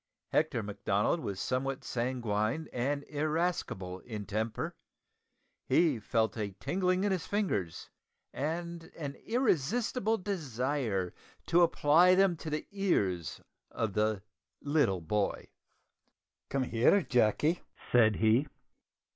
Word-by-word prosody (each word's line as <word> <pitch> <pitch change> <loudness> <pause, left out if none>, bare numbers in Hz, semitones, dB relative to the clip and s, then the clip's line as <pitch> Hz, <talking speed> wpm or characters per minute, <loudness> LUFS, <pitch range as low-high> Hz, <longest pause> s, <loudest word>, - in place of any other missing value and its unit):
Hector 150 -7 +1
Macdonald 105 - 0
was 100 -10 -4
somewhat 130 +3 -2
sanguine 120 +2 -1
and 140 +4 -1
irascible 150 - -2
in 105 -2 -7
temper. 110 +3 -3 0.9
He 160 -8 +3
felt 110 +1 0
a 100 -3 -3
tingling 185 0 +1
in 205 - +1
his 185 -3 -2
fingers, 105 - -1 0.5
and 170 +3 -3
an 145 -4 -4
irresistible 225 - +1
desire 130 - -2 0.3
to 175 - +4
apply 170 +2 +5
them 190 -2 +4
to 160 - -6
the 150 0 -3
ears 100 - 0 0.3
of 110 -4 -2
the 105 -1 0 0.4
little 145 - +1
boy. 100 +5 -1 1.0
"Come 135 -1 0
here, 125 - +3
Jacky!" 130 - +2 0.3
said 110 -3 +5
he. 115 +7 +3
135 Hz, 110 wpm, -31 LUFS, 110-170 Hz, 1.0 s, apply